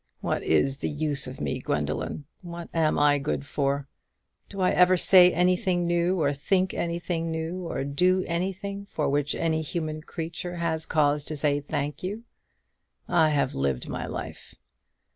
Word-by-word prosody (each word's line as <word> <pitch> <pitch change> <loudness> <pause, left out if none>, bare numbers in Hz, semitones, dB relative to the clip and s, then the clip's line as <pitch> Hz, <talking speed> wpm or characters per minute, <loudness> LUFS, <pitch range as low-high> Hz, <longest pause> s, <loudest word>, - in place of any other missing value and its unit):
What - - -1
is 135 - +2
the - - -2
use 150 -2 0
of 130 - -8
me, 130 - -2
Gwendoline? 75 - -2 0.2
what 170 -1 -8
am 160 -2 +2
I 145 -1 +4
good 140 0 -3
for? 140 -1 -1 0.6
Do 195 - -8
I 185 - +3
ever 180 0 +5
say 180 0 +8
anything 180 0 +1
new, 175 +2 +1
or 145 -2 +2
think 185 +6 0
anything 170 -1 -2
new, 165 +2 -4
or 135 - -3
do 180 +7 +2
anything 195 +3 -3
for 155 - -2
which 145 +1 0
any 160 -1 0
human 155 0 -3
creature 170 +2 -6
has 165 -2 -2
cause 145 -1 +2
to 155 - -4
say, 145 0 +1
Thank 145 0 -4
you? 205 +5 -5 0.8
I 160 -2 +4
have 145 -3 +1
lived 70 -2 -1
my - - -4
life. - - -7
160 Hz, 160 wpm, -26 LUFS, 145-180 Hz, 0.8 s, say